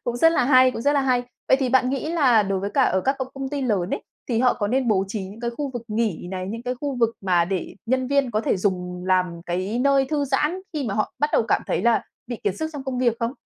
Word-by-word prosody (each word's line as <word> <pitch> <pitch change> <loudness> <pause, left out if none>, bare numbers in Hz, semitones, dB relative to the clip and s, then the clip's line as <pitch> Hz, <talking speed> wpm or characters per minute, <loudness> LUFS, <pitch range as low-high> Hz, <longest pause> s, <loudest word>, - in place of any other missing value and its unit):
Cũng 240 0 -2
rất 325 +6 +5
là 250 - +2
hay, 255 -1 +6
cũng 230 - -6
rất 285 - +3
là 285 - +2
hay! 255 -2 +2 0.3
Vậy 265 - +6
thì 260 - +1
bạn 255 0 +3
nghĩ 290 +4 -2
là 255 -10 +4
đối 195 -1 -1
với 200 +1 -3
cả 275 - +2
ở 190 - +2
các 270 +6 0
công 260 -1 -3
công 270 -1 -4
ty 285 0 -3
lớn 200 -7 0
ấy, - - -2 0.3
thì 230 - +1
họ 250 - +4
có 205 -2 -2
nên 255 +1 +1
bố 195 -3 +2
trí 200 -2 -4
những 205 +5 -10
cái 235 - -2
khu 285 -2 -2
vực 240 -2 -5
nghỉ 210 -6 -1
này, 185 -1 -4
những 230 +3 -5
cái 250 0 -2
khu 285 -3 -3
vực 230 0 +2
mà 180 -3 +2
để 185 -1 -4
nhân 260 +1 +1
viên 280 -2 +1
có 215 0 0
thể 215 - 0
dùng 180 -2 -2
làm 180 -2 +1
cái 185 +6 -2
nơi 275 0 +3
thư 290 -2 +1
giãn 300 +6 0
khi 295 -3 -2
mà 195 - -2
họ 215 - -1
bắt 295 +1 +1
đầu - - +4
cảm - - +2
thấy - - -1
là 235 -1 +3 0.2
bị 240 -1 -4
kiệt 195 -2 0
sức 315 0 -3
trong 285 -2 -7
công 260 -2 -3
việc 240 -2 +2
không? 230 +2 -1
240 Hz, 295 wpm, -23 LUFS, 200-270 Hz, 0.3 s, hay